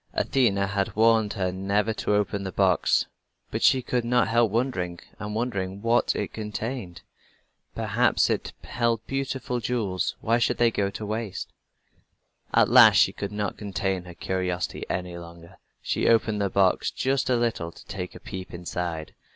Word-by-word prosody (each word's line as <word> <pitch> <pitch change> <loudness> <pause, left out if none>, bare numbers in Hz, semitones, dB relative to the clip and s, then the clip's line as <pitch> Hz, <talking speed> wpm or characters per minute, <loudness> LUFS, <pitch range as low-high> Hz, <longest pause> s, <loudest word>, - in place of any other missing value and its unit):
Athena 100 -7 +2
had 100 0 -2
warned 110 -1 +4
her 95 -4 -1
never 100 +4 0
to 105 - 0
open 100 -1 0
the 95 -1 -4
box, 95 -4 +2 0.5
but - - -2
she 130 -1 +4
could 125 0 -1
not 125 0 +2
help 115 0 +3
wondering 95 -8 -1 0.2
and 105 0 -5
wondering 100 -5 -2
what 115 +1 +2
it - - -3
contained. 110 -2 -5 0.7
Perhaps - - +2
it - - -2
held 115 -2 -1
beautiful 135 -2 -2
jewels. 105 -6 -1
Why 115 +2 +1
should 120 - +1
they 120 -1 +4
go 100 -2 0
to 105 +2 -6
waste? 110 -2 -4 1.0
At - - +5
last - - +8
she - - +5
could 100 0 -5
not 105 -2 -3
contain 95 -3 -2
her 90 -1 -10
curiosity 90 -1 -3
any 90 -1 -3
longer. 85 0 -13 0.3
She - - 0
opened 110 -2 +2
the 100 - +1
box 95 -1 +2
just 135 0 0
a 125 - +4
little 115 -8 -1
to - - -15
take 90 -1 -6
a - - -9
peep 95 -1 -8
inside. 85 -2 -4
105 Hz, 165 wpm, -26 LUFS, 95-115 Hz, 1.0 s, last